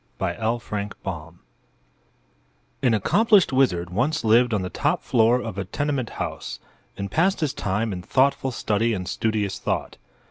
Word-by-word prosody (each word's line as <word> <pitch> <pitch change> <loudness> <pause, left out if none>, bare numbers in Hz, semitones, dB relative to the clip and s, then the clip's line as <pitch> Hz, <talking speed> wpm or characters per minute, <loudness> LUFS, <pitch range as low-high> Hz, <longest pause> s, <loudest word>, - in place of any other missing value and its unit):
THE 85 - -1
GLASS 105 0 -3
DOG 85 -3 -6 1.5
An 125 -4 +3
accomplished 205 - +4
wizard 90 -10 +2
once 135 +11 0
lived 115 +2 +4
on 105 -4 0
the 90 - -4
top 150 +5 0
floor 120 -1 +3
of 100 -5 -5
a 100 - -3
tenement 140 +3 -2
house - - -4 0.4
and 100 0 -4
passed 185 - +2
his 150 -3 0
time 105 -1 -1
in 90 - -5
thoughtful 135 +6 +2
study 115 -1 0
and 90 -2 -5
studious 105 -1 -1
thought. - - -2
115 Hz, 150 wpm, -24 LUFS, 100-135 Hz, 1.5 s, accomplished